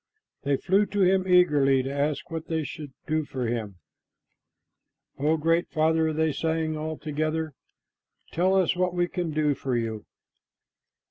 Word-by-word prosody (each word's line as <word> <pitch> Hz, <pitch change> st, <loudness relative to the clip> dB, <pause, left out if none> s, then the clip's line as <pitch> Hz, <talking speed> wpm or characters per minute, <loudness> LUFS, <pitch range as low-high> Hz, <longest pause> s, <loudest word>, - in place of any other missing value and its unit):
They 140 Hz, -1 st, +1 dB
flew 200 Hz, +7 st, +2 dB
to 205 Hz, -, -1 dB
him 190 Hz, 0 st, +3 dB
eagerly 145 Hz, -7 st, +4 dB
to 135 Hz, +1 st, -4 dB
ask 145 Hz, +3 st, -2 dB
what 165 Hz, -1 st, -5 dB
they 160 Hz, -1 st, -1 dB
should 145 Hz, -1 st, -7 dB
do 155 Hz, 0 st, 0 dB
for 130 Hz, -3 st, -4 dB
him. 115 Hz, -4 st, -3 dB, 1.4 s
"O 155 Hz, +3 st, +2 dB
Great 165 Hz, +2 st, +1 dB
Father," 160 Hz, 0 st, +2 dB
they 160 Hz, 0 st, +1 dB
sang 160 Hz, +1 st, -1 dB
all 155 Hz, 0 st, -4 dB
together, 155 Hz, 0 st, -2 dB, 0.8 s
"tell 185 Hz, +3 st, +2 dB
us 185 Hz, -2 st, +2 dB
what 180 Hz, 0 st, 0 dB
we 175 Hz, 0 st, +1 dB
can 175 Hz, -1 st, -3 dB
do 150 Hz, -1 st, +1 dB
for 130 Hz, -2 st, -2 dB
you." 110 Hz, -2 st, -4 dB
155 Hz, 150 wpm, -26 LUFS, 145-170 Hz, 1.4 s, eagerly